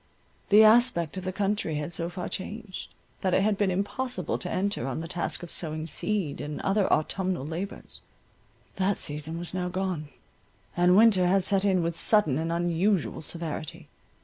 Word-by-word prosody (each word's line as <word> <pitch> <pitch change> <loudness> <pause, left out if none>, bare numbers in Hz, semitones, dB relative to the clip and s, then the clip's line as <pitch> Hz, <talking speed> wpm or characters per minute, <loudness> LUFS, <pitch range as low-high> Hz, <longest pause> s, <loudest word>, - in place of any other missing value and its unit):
The 210 +2 +8
aspect 215 - +4
of 185 - -4
the 185 - -1
country 200 -4 -1
had 150 +3 -4
so 170 +1 -2
far 180 0 -5
changed, 210 0 -6 0.3
that 185 -2 +1
it 190 - +3
had 210 0 +2
been 200 -1 +1
impossible 205 +7 -2
to 180 - -5
enter 200 -3 -1
on 135 +2 -3
the 165 - -5
task 175 +1 -2
of 175 - -5
sowing 155 -1 0
seed, 180 -2 -2
and 150 0 -5
other 195 0 +1
autumnal 180 0 0
labours. 170 +6 -6 0.8
That 195 +1 +1
season 150 +2 -3
was 175 +1 -4
now 180 -1 -2
gone; 180 -5 -3 0.7
and 180 +1 +4
winter 205 -5 +5
had 190 +1 +3
set 195 0 +2
in 190 -3 +2
with 165 0 -2
sudden 165 - +3
and 165 +1 -2
unusual 175 +3 0
severity. 160 0 -5
180 Hz, 175 wpm, -27 LUFS, 165-200 Hz, 0.8 s, The